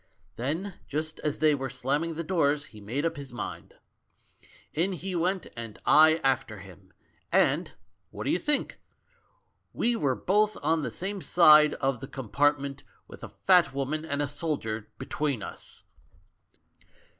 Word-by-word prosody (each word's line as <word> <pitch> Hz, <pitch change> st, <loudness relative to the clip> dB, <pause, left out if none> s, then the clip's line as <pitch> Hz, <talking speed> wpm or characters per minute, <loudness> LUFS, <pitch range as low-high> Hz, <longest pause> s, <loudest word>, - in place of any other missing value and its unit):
Then 165 Hz, +10 st, -3 dB
just 155 Hz, +2 st, -4 dB
as 150 Hz, -1 st, -2 dB
they 155 Hz, -1 st, +4 dB
were 135 Hz, -2 st, -3 dB
slamming 140 Hz, +6 st, -1 dB
the 165 Hz, -, -3 dB
doors, 150 Hz, -4 st, +1 dB
he 105 Hz, -, -12 dB
made 125 Hz, +10 st, -3 dB
up 165 Hz, -1 st, -1 dB
his 140 Hz, -2 st, -8 dB
mind. 120 Hz, -, -7 dB, 1.0 s
In 180 Hz, +5 st, +1 dB
he 185 Hz, +2 st, -4 dB
went, 180 Hz, +2 st, 0 dB
and 115 Hz, -2 st, -7 dB
I 155 Hz, +1 st, +7 dB
after 130 Hz, -5 st, 0 dB
him, 95 Hz, -4 st, -14 dB, 0.4 s
and -, -, +2 dB, 0.2 s
— -, -, -48 dB
what -, -, -7 dB
do -, -, 0 dB
you 180 Hz, -, +1 dB
think? 295 Hz, +6 st, 0 dB, 0.9 s
We 240 Hz, +1 st, +1 dB
were 140 Hz, -, 0 dB
both 210 Hz, +6 st, +1 dB
on 160 Hz, +2 st, +2 dB
the -, -, -2 dB
same 195 Hz, +2 st, -5 dB
side 155 Hz, -4 st, +6 dB
of 135 Hz, -3 st, -1 dB
the 135 Hz, -, -7 dB
compartment, 140 Hz, +3 st, 0 dB, 0.3 s
with -, -, -13 dB
a -, -, -7 dB
fat 180 Hz, -7 st, +3 dB
wo:iian 140 Hz, +3 st, -2 dB
and 145 Hz, -2 st, -2 dB
a -, -, -1 dB
soldier 115 Hz, -8 st, -4 dB
between 140 Hz, -8 st, -2 dB
us! -, -, -8 dB
150 Hz, 155 wpm, -28 LUFS, 135-165 Hz, 1.0 s, I